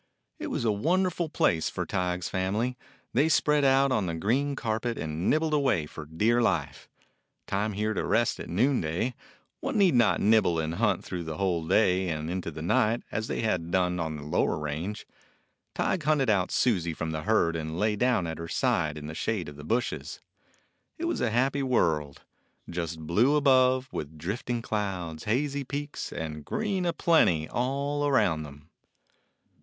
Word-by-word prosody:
It - - -4
was - - -2
a 110 - +3
wonderful 170 - 0
place 80 - +1
for - - -3
Tige's 90 -1 -1
family. 105 +7 -1 0.4
They 145 +6 +3
spread 150 -1 +3
out 135 0 +4
on 105 -7 +1
the 85 - -2
green 130 - 0
carpet 115 -1 -2
and 80 +4 -2
nib 155 - +3
bled 160 -1 -1
away 130 - +2
for 75 0 -9
dear 110 +10 +2
life. 75 -11 -1 0.6
Time 105 +2 -1
here 105 +2 -1
to - - -2
rest 120 +1 +1
at - - -7
noonday; 110 - +1 0.5
one 270 -3 -2
need 195 -5 +5
not 120 -3 +4
nibble 105 -5 +3
and 80 0 -1
hunt - - +1
through 90 -2 -5
the 80 -1 -5
whole 85 -4 0
day 95 -1 +3
and 80 0 -3
into 90 -2 -3
the 80 0 -7
night, 110 +7 +2
as 110 0 -2
they - - -2
had 95 -7 -1
done 90 0 +1
on 80 -2 -2
the 75 - -7
lower 75 - 0
range. 80 +7 -4 0.7
Tige 185 - 0
hunted 150 -5 +2
out 95 -3 +1
Susie 90 -9 +1
from 80 0 -3
the 80 -1 -3
herd 85 -4 +2
and 80 0 -4
lay 105 +2 +1
down 120 -4 +2
at 80 -1 -5
her 85 - -5
side 75 -2 0
in 75 - -7
the 75 - -6
shade 95 0 -2
of 75 - -9
the 75 - -10
bushes. 120 +10 -2 0.8
It 335 - -3
was 340 - -1
a 120 - +2
happy 135 +5 +1
world 80 - 0 0.3
— - - -44
just 85 -2 -4
blue 105 - +3
above, 130 -3 +4
with 75 +1 -6
drifting 115 +8 -3
clouds, 90 -8 -3
hazy 140 +5 0
peaks, 145 +2 -5
and 75 -2 -5
green 200 - -1
a - - +2
plenty 90 - +3
all 140 +3 -1
around 105 - +2
them. 75 +1 -11
105 Hz, 180 wpm, -28 LUFS, 80-130 Hz, 0.8 s, need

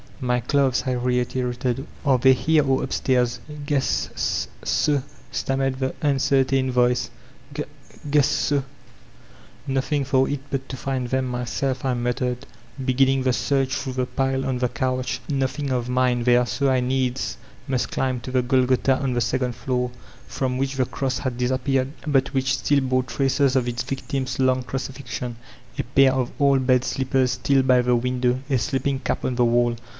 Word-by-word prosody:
"My 125 0 +1
clothes/' 135 +1 +1
I 130 - +1
reiterated; 125 +1 -1 0.2
''are 130 -3 +3
they 130 0 +7
here 155 +4 +3
or 135 0 +2
up 130 - -3
stairs? 125 -2 +1 0.3
"Guess 145 -2 0
s - - -1 0.2
so/' 145 -2 +1 0.3
stammered 135 -1 -1
the 130 -1 0
tmcertain 135 -2 +2
voice, 125 -1 +2 0.4
"g 150 +1 -2 0.5
guess 145 0 +2 1.1
''Nothing 135 +2 0
for 135 0 +2
it 145 - -1
but 135 -1 -2
to 130 - -5
find 130 -2 -2
them 130 +1 0
myself/' 125 +2 -2
I 130 -2 +1
mattered, 125 +1 -2 0.4
beginning 135 +1 +2
the 130 -1 +2
search 135 +1 0
through 130 -1 -3
the 130 0 0
pile 135 +1 -1
on 130 -2 -1
the 125 -1 +1
couch. 130 +1 -2
Nothing 135 0 -1
of 125 -1 -1
mine 125 -1 +2
there, 120 0 +4
so 140 +3 0
I 130 -1 +2
needs 130 0 -1 0.3
must 130 -3 -1
climb 130 -2 -1
to 130 - -7
the 130 -1 +2
Golgotha 130 +1 +2
on 135 -3 -1
the 120 - 0
second 125 0 -1
floor, 125 -1 -1 0.4
from 130 -1 -2
which 135 0 -1
the 130 -1 +1
Cross 130 0 -2
had 130 -3 -3
disappeared, 130 +2 0
but 135 -3 +2
which 130 -1 +1
stiD 140 -1 +1
bore 130 0 +2
traces 135 +1 +1
of 125 -2 +2
its 120 -1 -2
victim's 130 0 -3
long 130 -1 +3
crucifixion, 125 -2 -5 0.2
— 125 0 -19
a - - +1
pair 135 +2 +4
of 130 -2 -1
old 135 -2 +3
bed 125 -1 +4
slippers 130 -1 +1
still 135 +2 +2
by 130 -1 +4
the 125 0 +2
window, 125 +1 0
a 130 - +3
sleeping<ap 135 +1 -1
on 130 - 0
the 120 0 +2
wall. 120 0 +2
130 Hz, 170 wpm, -23 LUFS, 125-135 Hz, 1.1 s, they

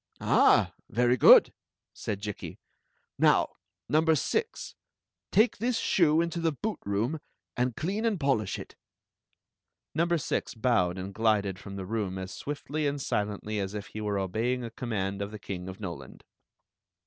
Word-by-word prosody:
"Ah! - - +4 0.2
very 120 +2 +3
good!" 125 - +8 0.4
said 100 -3 -4
Jikki. 105 -2 -6 0.6
"Now, - - +4 0.4
number 160 +1 +3
six, 450 - -2 0.6
take 220 +3 +3
this 240 +2 0
shoe 165 -6 +3
into 170 0 -2
the 165 -1 +1
boot 210 +9 -4
room, 115 +10 0 0.4
and 125 -1 0
clean 195 +7 -2
and 220 -5 +1
polish 130 -9 0
it." - - -10 1.2
Number 170 +2 +2
six 145 - -2
bowed 110 -7 +1
and 95 +1 -6
glid^ 100 -3 +1
from 100 0 -9
the 95 -1 -5
room 100 -2 -2
as 95 0 -6
swiftly 150 +1 -3
and 140 0 -2
silently 105 -3 -2
as 100 +1 -3
if 105 -1 -6
he 110 - -6
were 105 -1 -1
obeying 115 +7 -1
a 115 - -6
command 100 -5 -3
the 105 +2 -5
King 95 -3 -6
of 95 - -9
Noland. 90 -5 -8
110 Hz, 150 wpm, -28 LUFS, 100-155 Hz, 1.2 s, good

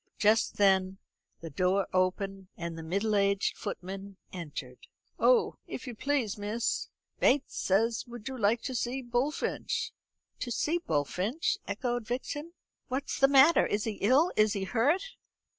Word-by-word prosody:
Just 215 +2 +3
then 190 -1 +3 0.4
the 165 -1 -7
door 185 +5 +1
opened, 190 +1 0
and 170 -1 -4
the 165 - -7
middle 200 +6 0
aged 200 0 +2
footman 195 -1 -6 0.2
entered. 145 -8 -7 0.3
"Oh, - - +4
if - - -6
you 250 - -5
please, 240 -4 -1
miss, 215 +3 -1 0.3
Bates 275 +1 +2
says 225 +4 +1
would 240 -1 -9
you 265 - -4
like 225 0 +1
to 260 - -3
see 250 +2 -2
Bullfinch?" 245 +5 -1 0.5
"To 245 - -3
see 315 +8 0
Bullfinch," 185 - -1
echoed 240 -3 -2
Vixen. 290 +7 -4 0.3
"What's 265 +2 -3
the 270 - +7
matter? 280 +4 +6
Is 205 0 -1
he 220 -3 -4
ill? 270 - +4
Is 215 -1 +4
he 200 - -2
hurt?" 255 - +2
215 Hz, 145 wpm, -30 LUFS, 195-255 Hz, 0.5 s, the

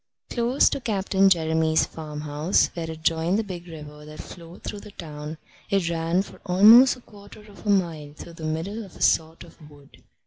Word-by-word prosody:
Close 245 +3 +2
to - - -1
Captain 195 -3 +2
Jeremy's 160 -2 +2
farmhouse, 150 +2 -1
where 165 -2 -5
it 160 0 -8
joined 165 +4 +1
the 225 - 0
big 180 -4 -8
river 150 -2 -10
that 155 0 -11
flowed 170 0 -11
through 205 - -5
the 210 - -12
town, 155 -4 -8 0.3
it 195 -4 +1
ran 165 +3 0
for - - -15
almost 215 +8 +7
a 250 - -16
quarter 205 -1 -15
of 210 0 -14
a - - +1
mile 165 -7 0
through 170 - -11
the 165 -1 -11
middle 165 +8 -3
of 195 - -14
a - - -14
sort 160 0 +1
of 165 -3 -16
wood. 145 -2 -19
170 Hz, 195 wpm, -24 LUFS, 160-200 Hz, 0.3 s, almost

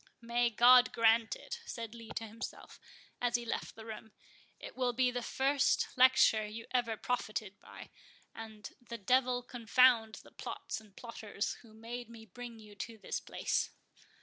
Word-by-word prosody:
"May 240 +1 +1
God 245 +2 +7
grant 225 0 +4
it!" 480 -1 -7
said 230 -2 -6
Lee 230 -1 -11
to 225 - -3
himself, 225 +1 -8 0.4
as 245 -1 +1
he 240 0 -1
left 230 - -3
the 220 - -10
room—"it 220 -1 -12
will 250 -1 0
be 250 +1 +2
the 245 0 -3
first 270 +3 +2
lecture 255 -4 +6
you 215 +2 -7
ever 240 -3 0
profited 215 -4 -3
by; - - -12 0.4
and 220 -2 -9
the 235 -1 -7
devil 250 +3 +2
confound 240 -2 +4
the - - -17
plots - - -6
and 210 -3 -20
plotters 220 -3 -4
who 220 -2 -17
made 235 +1 -7
me 225 -1 -11
bring 235 +3 -9
you 210 -1 -13
to 230 +1 -6
this - - -3
place!" - - -1
230 Hz, 160 wpm, -33 LUFS, 220-245 Hz, 0.4 s, God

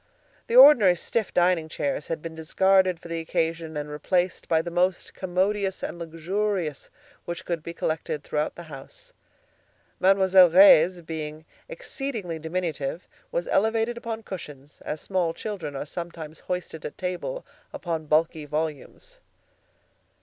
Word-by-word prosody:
The 235 - -1
ordinary 250 -9 +9
stiff 215 +5 -2
dining 175 -3 +2
chairs 145 -1 -2
had 160 -2 -4
been 165 -1 -6
discarded 185 +3 +2
for - - -11
the 165 0 -3
occasion 165 -1 -2
and 150 0 -3
replaced 175 +5 -1
by 160 -1 +2
the 170 - -5
most 180 +1 0
commodious 190 +2 -1
and 170 - -5
luxurious 170 0 -3 0.4
which 170 -1 -5
could 170 -2 -2
be 170 +2 -8
collected 155 -2 -2
throughout 150 0 -2
the 175 - -9
house. 155 - -12 0.9
Mademoiselle 190 -1 +6
Reisz, 180 -1 +7
being 155 -1 -6 0.2
exceedingly 235 - -5
diminutive, 160 -2 -3 0.2
was - - -2
elevated 225 +3 +1
upon 230 -1 -5
cushions, 145 -7 -9
as 150 - -4
small 180 -4 -1
children 190 -9 -5
are 135 - -4
sometimes 165 -1 -7
hoisted 180 -3 -4
at - - -7
table 185 - -4 0.3
upon 165 -3 -4
bulky 155 0 +1
volumes. 155 - -5
170 Hz, 135 wpm, -25 LUFS, 160-190 Hz, 0.9 s, ordinary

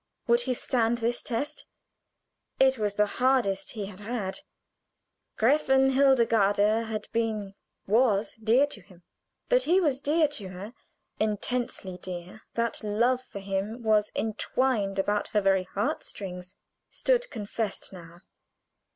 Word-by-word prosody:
Would 235 0 +3
he 250 +1 -1
stand 235 -1 +1
this 235 +1 -1
test? 285 +6 -3 0.9
It 265 -2 +4
was 205 -1 -1
the 210 - +4 0.2
hardest 245 -7 +2
he 210 -4 -4
had 195 -1 -10
had. 210 0 -3 1.0
Gräfin 265 +2 +4
Hildegarde 230 -5 +3
had 215 -1 -4
been 215 -4 -1 0.3
was 215 -1 +2
dear 230 +5 +4
to 285 -8 -7
him. 180 -1 -19 0.5
That - - +4
he 360 +3 +4
was 285 -7 +1
dear 305 +2 +3
to 255 -10 -5
her, 190 +5 -8 0.5
intensely 215 -3 -2
dear, 180 +3 -8
that 235 -1 -1
love 235 +5 +2
for 255 - -11
him 200 +4 -3
was 215 -1 +3
intwined 220 -1 0
about 205 +2 0
her 210 - +1
very 195 -1 +2
heart 200 +4 -2
strings, 180 -2 -7 0.3
stood - - +1
confessed 210 - -4
now. 170 -1 -12
220 Hz, 135 wpm, -27 LUFS, 200-255 Hz, 1.0 s, It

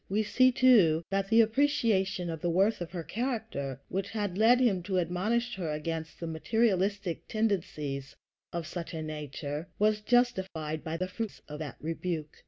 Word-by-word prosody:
We 210 +3 +1
see, 255 +5 +4
too, 215 -12 +5
that 195 0 0
the 225 +1 +7
appreciation 220 - +1
of 160 -2 -6
the 175 - 0
worth 195 +4 +2
of 175 - -4
her 175 -2 -5
character, 215 - -3
which 195 +1 -3
had 205 -5 -2
led 225 +5 +5
him 215 -8 +3
to 185 +1 -2
admonish 215 +8 0
her 170 -5 -2
against 160 +1 -4
the 170 - -4
materialistic 195 +1 0
tendencies 150 - -2 0.4
of 170 -1 -3
such 170 0 -6
a 160 - -3
nature, 150 +1 -5
was 210 0 +2
justified 190 -10 0
by 160 +1 -3
the 185 +2 -2
fruits 215 +3 -6
of 150 0 -7
that 150 -4 -5
rebuke. 160 -1 -3
185 Hz, 170 wpm, -30 LUFS, 160-220 Hz, 0.4 s, the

